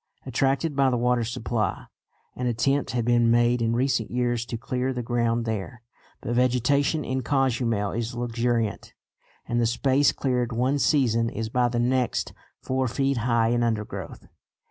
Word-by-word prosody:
Attracted 135 +4 0
by 135 -1 +3
the 125 - 0
water 125 0 +1
supply, 115 -1 -2 0.5
an 125 - -2
attempt 135 +4 0
had 120 -1 -1
been 120 -1 +3
made 120 +1 +3
in 115 0 +1
recent 125 -3 0
years 120 -1 -1
to 115 - -4
clear 125 +3 -2
the 125 -2 -4
ground 115 -1 0
there. 110 +2 -4 0.4
But 120 - -3
vegetation 125 +5 +2
in 130 +1 -2
Cozumel 120 -6 0
is 115 +1 -3
luxuriant, 120 -2 -2 0.5
and 120 0 0
the 115 - +2
space 135 +4 +2
cleared 125 -2 -1
one 130 +5 +1
season 115 -6 +2
is 110 0 -4
by 125 +1 +2
the 120 - -3
next 125 +1 0 0.3
four 130 0 0
feet 135 +2 0
high 115 -1 +2
in 120 0 +1
undergrowth. 110 -3 -3
120 Hz, 160 wpm, -25 LUFS, 115-130 Hz, 0.5 s, by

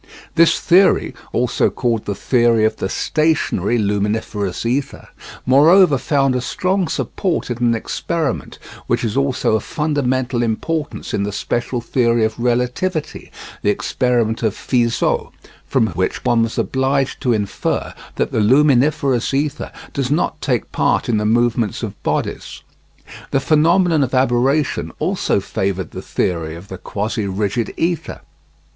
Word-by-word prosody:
This 165 0 +4
theory 185 -6 +3 0.2
also 125 0 +1
called 115 -4 -1
the 100 - -3
theory 115 0 +2
of 110 0 0
the 95 - -3
stationary 155 - 0
luminiferous 105 -1 -1
ether 135 +4 -2 0.4
moreover 150 +3 +5
found 135 -1 +1
a 125 - 0
strong 185 +8 -1
support 165 -1 -2
in 120 - -3
an 120 -1 +2
experiment 135 - -3 0.3
which 120 +1 0
is 110 -2 -2
also 135 -4 +1
of 110 - -1
fundamental 130 -5 -1
importance 145 +7 -3
in - - 0
the 100 +1 -2
special 120 +4 -2
theory 115 -1 +2
of 110 - -4
relativity, 125 +8 -1 0.3
the - - +1
experiment 115 +1 0
of 110 -3 0
Fizeau, 120 -2 0 0.4
from - - +2
which 95 +2 -2
one 120 -1 +3
was 115 0 -1
obliged 135 0 0
to 125 - +1
infer 105 -3 -2 0.2
that - - -1
the - - 0
luminiferous 135 +1 +3
ether 145 +1 -2 0.2
does 135 -3 -1
not 150 +4 0
take - - -1
part - - +1
in 115 - +2
the 105 - -1
movements 120 -1 +1
of - - -6
bodies. - - -3 0.7
The 135 - +1
phenomenon 160 +2 +3
of 130 0 -2
aberration 130 +3 +1
also 185 - 0
favoured 95 -2 -3
the - - -7
theory 80 -3 -2
of 90 +4 -12
the 95 - -7
quasi 105 0 -3
rigid 105 +3 -1
ether. 170 0 -2
120 Hz, 140 wpm, -19 LUFS, 110-140 Hz, 0.7 s, moreover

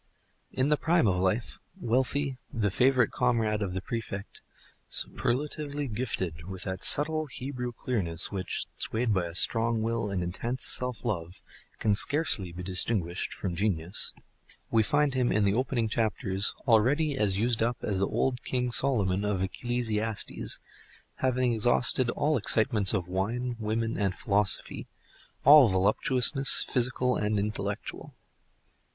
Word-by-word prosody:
In 130 +2 0
the 150 - +2
prime 165 -5 +2
of 90 -2 +1
life, 95 +5 -2 0.2
wealthy, 130 +1 -1
the 105 -4 -1
favorite 125 +2 +2
comrade 115 -4 0
of 95 -3 -3
the 95 - -4
Prefect, 110 -4 -6 0.5
superlatively 145 +3 0
gifted 95 -9 -4
with 95 -2 -6
that 95 0 -5
subtle 155 +1 +5
Hebrew 125 -2 -6
clearness, 95 -9 -2
which, 95 -2 -2
swayed 115 0 -1
by 90 -3 -1
a 85 - -10
strong 115 +4 +4
will 115 -1 -2
and 95 -3 -2
intense 115 +9 -2
self 125 -2 +2
love, 90 -6 -4 0.3
can 105 -2 +1
scarcely 105 - +2
be 90 +2 -8
distinguished 90 -1 0
from 95 -3 -5
genius, 90 -2 +1 0.6
we 115 - +4
find 145 +3 +1
him 125 -2 0
in 110 - +1
the 100 -1 +2
opening 120 -1 -1
chapters 105 -3 -2
already 135 +7 +2
as 100 -6 +1
used 115 +2 0
up 120 +1 0
as 100 -3 -2
the 100 - +1
old 125 -2 -1
King 125 -1 -2
Solomon 105 -8 +1
of 100 -2 -1
Ecclesiastes, 110 0 -2 0.6
having 130 -1 0
exhausted 120 +2 +2
all 150 +4 0
excitements 105 -2 +2
of 90 -4 -2
wine, 115 +7 -3
women, 115 +1 -2
and 100 -2 -1
philosophy, 100 0 0 0.6
all 145 -1 +8
voluptuousness, 125 +8 +2
physical 125 0 0
and 105 0 -1
intellectual. 100 -1 -5
115 Hz, 140 wpm, -28 LUFS, 100-125 Hz, 0.6 s, all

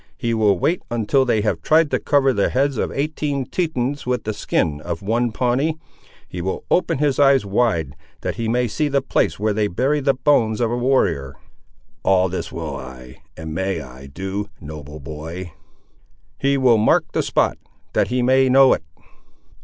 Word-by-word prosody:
He 115 -1 -1
will 105 -4 +3
wait 170 - 0
until 120 +4 +1
they 115 -4 +1
have 105 - -1
tried 155 -1 +3
to - - +1
cover 135 -2 +2
the 100 -3 +1
heads 140 +1 +1
of - - -1
eighteen 145 -1 -2
Tetons 145 -4 -2
with 125 -2 -1
the 110 - -3
skin 75 -7 -1
of 85 +1 -5
one 115 +3 0
Pawnee; 130 +7 0 0.5
he 90 - -6
will 95 +2 -4
open 170 -3 +2
his 145 -1 +1
eyes 135 -5 +5
wide, 100 - 0 0.3
that - - -2
he 115 - -3
may 125 +1 +1
see 150 +7 -1
the 140 -1 0
place 135 - 0
where 105 0 +1
they 105 0 +1
bury 135 +10 0
the 135 -1 +1
bones 115 -6 +2
of 115 -2 +1
a - - 0
warrior." 85 - +1 0.7
"All 95 -1 +3
this 95 - -4
will 80 -4 -5
I, 65 -1 -10 0.2
and 80 -1 -6
may 95 0 -1
I, 65 -1 -11
do, 95 +7 -5
noble 75 -1 -9
boy." 80 +4 -7 0.9
"He 140 0 +2
will 125 -4 +4
mark 110 - +2
the - - 0
spot, - - 0 0.3
that - - +2
he 125 0 0
may 130 +1 +4
know 135 +1 +6
it." - - -2
115 Hz, 185 wpm, -21 LUFS, 90-135 Hz, 0.9 s, know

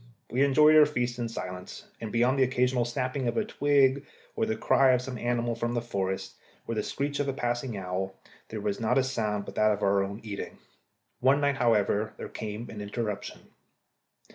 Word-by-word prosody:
We 130 +4 +3
enjoyed 150 +3 +6
our 150 -1 +8
feasts 125 -4 -2
in 120 -1 -2
silence, 90 -4 -7 0.2
and 110 -2 -5
beyond 125 +4 +2
an 130 - +6
occasional 125 -1 +1
snapping 125 +2 -2
of - - -1
a 220 - +1
twig, 140 -6 +3 0.3
or 225 - 0
the 220 - 0
cry 135 -10 +4
of 125 - +2
some 125 -2 -6
animal 120 0 0
from 120 +1 -2
the - - +2
forest, 95 -3 -3 0.3
or 115 - -2
the 110 - 0
screech 140 +5 -3
of 145 - 0
a 135 - 0
passing 120 -3 -2
owl, 95 0 -3 0.3
there 110 -1 -5
was 100 -1 -2
not 110 - +1
a 135 - +4
sound 105 -6 -2
but - - -8
that 110 0 +3
of 105 0 -2
our 100 0 +3
own 100 +2 -5
eating. 105 -2 -6 0.6
One 135 +3 +4
night, 140 -1 +1
however, 110 -3 +2
there - - -7
came 110 +2 -6
an 105 - -7
interruption. 105 -1 -4
120 Hz, 200 wpm, -28 LUFS, 105-130 Hz, 0.6 s, our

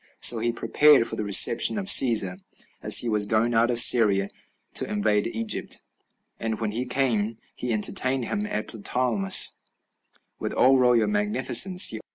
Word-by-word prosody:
So 115 - +4
he 120 +1 -4
prepared 145 +2 0
for - - -7
the - - -7
reception 105 - +3
of 200 - -7
Cæsar, 110 - +3 0.4
as - - +4
he 120 - -8
was 105 -2 -2
going 110 +2 -3
out 115 +1 -1
of 120 - -3
Syria 100 -5 +4 0.4
to - - -1
invade 105 0 -3
Egypt; 115 -1 -4 0.6
and 110 -1 -6
when 110 -2 -6
he 120 +4 -7
came, 115 -4 -3 0.2
he 125 - -8
entertained 130 +4 -1
him 205 - -6
at 105 - -7
Ptolemais 125 - +1 0.9
with - - -7
all 130 +1 0
royal 125 -2 0
magnificence. 205 - +3
115 Hz, 155 wpm, -21 LUFS, 110-130 Hz, 0.9 s, So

